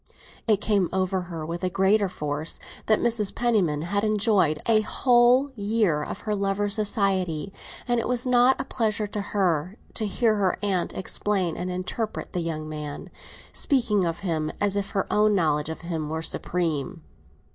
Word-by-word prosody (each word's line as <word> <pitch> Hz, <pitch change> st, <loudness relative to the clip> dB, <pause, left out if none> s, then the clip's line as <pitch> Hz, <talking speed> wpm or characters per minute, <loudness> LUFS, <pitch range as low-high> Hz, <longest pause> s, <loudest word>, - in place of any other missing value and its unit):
It 215 Hz, -2 st, +4 dB
came 200 Hz, -5 st, +1 dB
over 190 Hz, 0 st, 0 dB
her 165 Hz, -3 st, -5 dB
with 170 Hz, +3 st, -5 dB
a 185 Hz, -, +1 dB
greater 195 Hz, +2 st, +2 dB
force 150 Hz, -1 st, -3 dB, 0.3 s
that 215 Hz, -, +5 dB
Mrs. 225 Hz, -4 st, +2 dB
Penniman 195 Hz, -11 st, +1 dB
had 200 Hz, +4 st, -1 dB
enjoyed 210 Hz, -7 st, +2 dB
a 220 Hz, -2 st, +4 dB
whole 245 Hz, +4 st, +3 dB
year 205 Hz, -7 st, +1 dB
of 195 Hz, -, -6 dB
her 210 Hz, -, -2 dB
lover's 200 Hz, 0 st, 0 dB
society, 195 Hz, -5 st, 0 dB, 0.3 s
and 240 Hz, -1 st, +2 dB
it -, -, -2 dB
was 250 Hz, 0 st, +2 dB
not 250 Hz, +1 st, +4 dB
a -, -, -1 dB
pleasure 220 Hz, -4 st, -1 dB
to 205 Hz, 0 st, -4 dB
her 185 Hz, -2 st, -1 dB, 0.2 s
to 215 Hz, -, -1 dB
hear 215 Hz, +2 st, +1 dB
her 190 Hz, -3 st, +1 dB
aunt 190 Hz, -4 st, 0 dB
explain 190 Hz, -2 st, -1 dB
and 180 Hz, -, -4 dB
interpret 185 Hz, +5 st, -4 dB
the 180 Hz, -, -1 dB
young 160 Hz, -2 st, -3 dB
man, 150 Hz, -1 st, -6 dB, 0.4 s
speaking 230 Hz, -, +2 dB
of 170 Hz, +1 st, -2 dB
him 160 Hz, -5 st, -1 dB
as 205 Hz, -1 st, +1 dB
if 200 Hz, -1 st, -2 dB
her 195 Hz, -, -1 dB
own 210 Hz, 0 st, +4 dB
knowledge 150 Hz, -4 st, +1 dB
of 160 Hz, -, -6 dB
him 165 Hz, -3 st, -4 dB
were 160 Hz, +1 st, -3 dB
supreme. 165 Hz, -2 st, -2 dB
195 Hz, 170 wpm, -25 LUFS, 165-215 Hz, 0.4 s, that